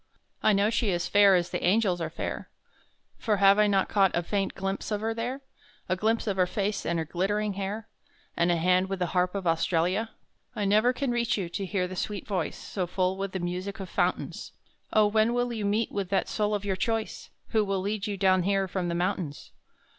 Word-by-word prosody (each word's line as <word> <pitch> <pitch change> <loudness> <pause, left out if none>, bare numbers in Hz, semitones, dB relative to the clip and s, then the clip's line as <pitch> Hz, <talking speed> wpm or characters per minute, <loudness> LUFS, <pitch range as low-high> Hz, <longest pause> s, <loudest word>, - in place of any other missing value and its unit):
I - - +4
know 200 +2 +2
she 230 -1 +1
is 175 -2 0
fair 200 -1 +6
as 175 0 0
the - - -3
angels 185 -2 +2
are 160 - -2
fair, - - -5 0.7
For 215 -3 +1
have 200 +1 +6
I 210 - +5
not 195 -2 +2
caught 195 -2 +3
a 175 - 0
faint 195 +2 -1
glimpse 195 0 -3
of 210 -1 -1
her 225 +1 -1
there; 245 +4 -4 0.5
A 185 - +1
glimpse 220 +4 0
of 200 -3 -1
her 180 -1 +3
face 200 +2 -2
and 170 - 0
her 160 - -1
glittering 200 +5 -1
hair, 200 +3 -4 0.5
And 170 +1 +2
a - - +3
hand 180 +3 +2
with 195 - -2
the 180 - 0
Harp 180 +1 +1
of 195 -2 -3
Australia? 175 +5 +1 0.5
I 210 -2 -1
never 215 +5 +4
can 255 0 -2
reach 235 -2 +1
you, 185 -4 -3
to 195 +3 -4
hear 185 -2 -1
the 185 - -7
sweet 205 +3 -3
voice 195 -3 -2
So 185 -3 -4
full 185 +1 0
with 195 0 -4
the 190 - -2
music 180 +4 -4
of 190 -2 -6
fountains! - - -2 0.4
Oh! 215 -1 +5
when 220 +3 +2
will 245 0 0
you 215 -3 -3
meet 210 +2 0
with 195 -3 -3
that 195 - +1
soul 210 -1 0
of 205 0 -4
your 195 -2 0
choice, 225 +3 -2 0.2
Who 220 -1 +2
will 195 -1 -1
lead 205 +2 -2
you 205 -1 -3
down 185 -1 +3
here 195 +1 +1
from 185 -1 -2
the 170 - -1
mountains? 175 -4 -3
195 Hz, 225 wpm, -27 LUFS, 185-210 Hz, 0.7 s, fair